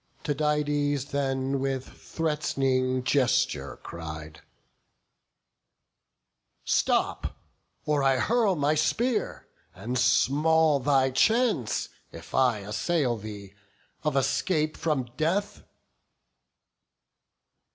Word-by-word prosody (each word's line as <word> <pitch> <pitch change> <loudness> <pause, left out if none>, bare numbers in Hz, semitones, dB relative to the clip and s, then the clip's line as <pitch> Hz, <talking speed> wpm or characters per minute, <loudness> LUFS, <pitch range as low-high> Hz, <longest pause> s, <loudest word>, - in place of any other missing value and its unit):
Tydides 145 -1 0
then 135 -1 -1
with 135 -1 -2
threat'ning 135 -5 -1
gesture 75 - +1
cried, 80 -1 -8 2.2
"Stop, - - 0 0.5
or 150 -2 +1
I 135 -1 +3
hurl 220 - +2
my 145 -1 +1
spear; 215 +11 -1 0.3
and 120 +7 -3
small 155 +4 +3
thy 135 -1 +2
chance, 220 - +1 0.2
If - - -12
I 125 -5 +2
assail 125 - 0
thee, 100 -2 -9 0.5
of 150 -2 -1
escape 150 +4 0
from 150 -5 -1
death." 200 +6 -1
140 Hz, 80 wpm, -27 LUFS, 125-155 Hz, 2.2 s, I